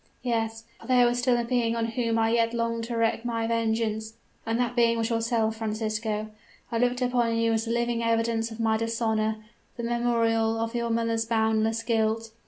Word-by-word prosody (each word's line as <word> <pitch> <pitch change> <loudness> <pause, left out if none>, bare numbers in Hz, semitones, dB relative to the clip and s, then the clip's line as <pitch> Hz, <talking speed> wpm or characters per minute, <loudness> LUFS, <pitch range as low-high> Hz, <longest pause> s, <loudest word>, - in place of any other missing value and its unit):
"Yes 225 -2 -1 0.2
for - - -13
there 250 -1 +5
was 240 0 +1
still 245 -1 +2
a 240 - 0
being 235 -1 0
on 230 -1 0
whom 230 -1 0
I 225 0 +2
yet 230 0 +2
longed 230 0 -1
to 235 0 -4
wreak 225 0 +1
my 230 -1 -1
vengeance; 225 -1 -1 0.3
and 225 +1 0
that 245 -1 0
being 230 -1 +3
was 225 +1 -1
yourself, 225 -1 0
Francisco? 215 -1 -2 0.4
I 230 - 0
looked 245 +1 +1
upon 240 -2 +1
you 230 0 +2
as 225 +1 0
the 230 - -3
living 235 0 0
evidence 230 0 +1
of 225 0 -10
my 220 -1 +2
dishonor 220 -1 -1 0.3
the 235 - -4
memorial 230 -1 +1
of 225 +1 -2
your 235 -1 -1
mother's 230 0 0
boundless 220 0 +1
guilt. 225 -1 0
230 Hz, 190 wpm, -27 LUFS, 225-235 Hz, 0.4 s, there